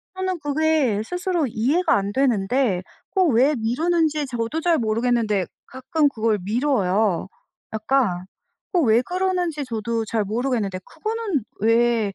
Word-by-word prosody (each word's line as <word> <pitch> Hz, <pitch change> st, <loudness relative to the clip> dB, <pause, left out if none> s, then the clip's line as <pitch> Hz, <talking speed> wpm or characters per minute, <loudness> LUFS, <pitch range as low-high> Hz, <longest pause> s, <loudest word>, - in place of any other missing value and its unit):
저는 375 Hz, -1 st, -2 dB
그게 290 Hz, -7 st, +1 dB
스스로 355 Hz, +3 st, -1 dB
이해가 255 Hz, +11 st, +1 dB
안 200 Hz, 0 st, -1 dB
되는데 240 Hz, -4 st, +1 dB, 0.3 s
어 380 Hz, -, +4 dB
왜 270 Hz, 0 st, +4 dB
미루는지 305 Hz, +6 st, +1 dB
저도 245 Hz, +5 st, -3 dB
잘 340 Hz, -1 st, +3 dB
모르겠는데 225 Hz, -3 st, +1 dB, 0.2 s
가끔 265 Hz, +4 st, 0 dB
그걸 220 Hz, -4 st, 0 dB
미뤄요. 210 Hz, -, +1 dB, 0.5 s
약간 220 Hz, -5 st, 0 dB, 0.5 s
어 360 Hz, -, +3 dB
왜 230 Hz, -4 st, +4 dB
그러는지 360 Hz, -1 st, -1 dB
저도 230 Hz, -1 st, -2 dB
잘 220 Hz, 0 st, -1 dB
모르겠는데 215 Hz, -3 st, -1 dB
그거는 435 Hz, -, -3 dB, 0.2 s
왜 230 Hz, -1 st, +2 dB
245 Hz, 270 characters per minute, -22 LUFS, 220-315 Hz, 0.5 s, 어